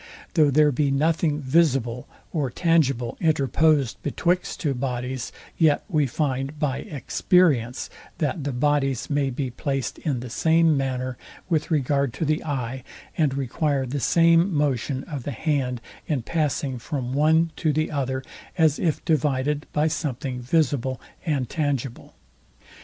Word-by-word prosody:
Though 155 Hz, -4 st, +5 dB
there 150 Hz, +1 st, +4 dB
be 140 Hz, +2 st, +1 dB
nothing 155 Hz, +1 st, +1 dB
visible 130 Hz, -5 st, +1 dB, 0.3 s
or 145 Hz, -6 st, 0 dB
tangible 135 Hz, -6 st, +1 dB
interposed 155 Hz, -3 st, +2 dB
betwixt 180 Hz, +1 st, -1 dB
two 145 Hz, -5 st, 0 dB
bodies, 125 Hz, -1 st, -3 dB, 0.3 s
yet 155 Hz, -3 st, +4 dB
we 155 Hz, -8 st, +1 dB
find 135 Hz, +1 st, -2 dB
BY 145 Hz, -3 st, -1 dB
EXPERIENCE, 140 Hz, -4 st, +1 dB, 0.3 s
that 150 Hz, 0 st, -1 dB
the 145 Hz, -, -2 dB
bodies 135 Hz, 0 st, 0 dB
may 140 Hz, -1 st, +1 dB
be 130 Hz, 0 st, -3 dB
placed 135 Hz, 0 st, -3 dB
in 135 Hz, -6 st, -2 dB
the 125 Hz, -, -7 dB
same 160 Hz, +3 st, +3 dB
manner, 130 Hz, -2 st, -2 dB, 0.3 s
with 155 Hz, -3 st, 0 dB
regard 140 Hz, -4 st, +1 dB
to 160 Hz, -, -2 dB
the 155 Hz, +1 st, 0 dB
eye, 130 Hz, -4 st, -3 dB, 0.3 s
and 150 Hz, -4 st, +1 dB
require 140 Hz, +1 st, 0 dB
the 135 Hz, +3 st, -3 dB
same 170 Hz, +5 st, +4 dB
motion 140 Hz, -3 st, 0 dB
of 145 Hz, -4 st, -6 dB
the 130 Hz, -, -5 dB
hand 130 Hz, -3 st, -1 dB, 0.3 s
in 140 Hz, -6 st, -1 dB
passing 140 Hz, -3 st, -1 dB
from 130 Hz, 0 st, -4 dB
one 160 Hz, +3 st, +3 dB
to 155 Hz, -, +1 dB
the 155 Hz, +1 st, 0 dB
other, 130 Hz, -2 st, -2 dB, 0.3 s
as 160 Hz, -3 st, +3 dB
if 160 Hz, -4 st, -1 dB
divided 145 Hz, -1 st, 0 dB
by 150 Hz, +1 st, +2 dB
something 135 Hz, -5 st, -3 dB
visible 130 Hz, -2 st, 0 dB, 0.3 s
and 140 Hz, -5 st, 0 dB
tangible. 140 Hz, -4 st, -3 dB
140 Hz, 140 wpm, -24 LUFS, 130-155 Hz, 0.3 s, Though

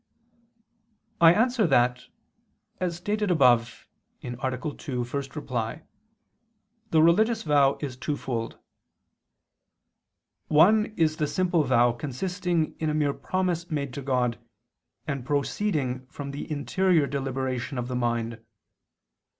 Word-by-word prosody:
I 165 Hz, -1 st, +9 dB
answer 225 Hz, +1 st, +2 dB
that, 125 Hz, -3 st, +2 dB, 0.7 s
As 180 Hz, -2 st, -1 dB
stated 205 Hz, +4 st, -2 dB
above 120 Hz, -8 st, +3 dB, 0.4 s
(A. 120 Hz, -, -5 dB
2, 120 Hz, 0 st, -9 dB, 0.7 s
ad 140 Hz, -1 st, -4 dB
1), 120 Hz, +4 st, -3 dB, 1.1 s
the 160 Hz, -1 st, +4 dB
religious 220 Hz, +7 st, +3 dB
vow 140 Hz, -3 st, +3 dB
is 135 Hz, -4 st, -5 dB
twofold. 130 Hz, -5 st, -3 dB, 1.9 s
One 205 Hz, +8 st, +5 dB
is 155 Hz, -1 st, +2 dB
the 150 Hz, -, 0 dB
simple 175 Hz, -1 st, +1 dB
vow 120 Hz, -2 st, +4 dB
consisting 170 Hz, +6 st, -2 dB
in 155 Hz, -, 0 dB
a 150 Hz, -, -1 dB
mere 145 Hz, -2 st, +1 dB
promise 180 Hz, -1 st, -2 dB
made 140 Hz, -5 st, -3 dB
to 140 Hz, -, -5 dB
God, 125 Hz, -3 st, 0 dB, 0.7 s
and 140 Hz, -4 st, -3 dB
proceeding 140 Hz, -2 st, -1 dB
from 140 Hz, +1 st, -7 dB
the 145 Hz, +2 st, -7 dB
interior 165 Hz, +2 st, +2 dB
deliberation 135 Hz, -1 st, -3 dB
of 120 Hz, 0 st, -3 dB
the 125 Hz, -, -4 dB
mind. 115 Hz, -2 st, -2 dB
145 Hz, 115 wpm, -26 LUFS, 125-170 Hz, 1.9 s, I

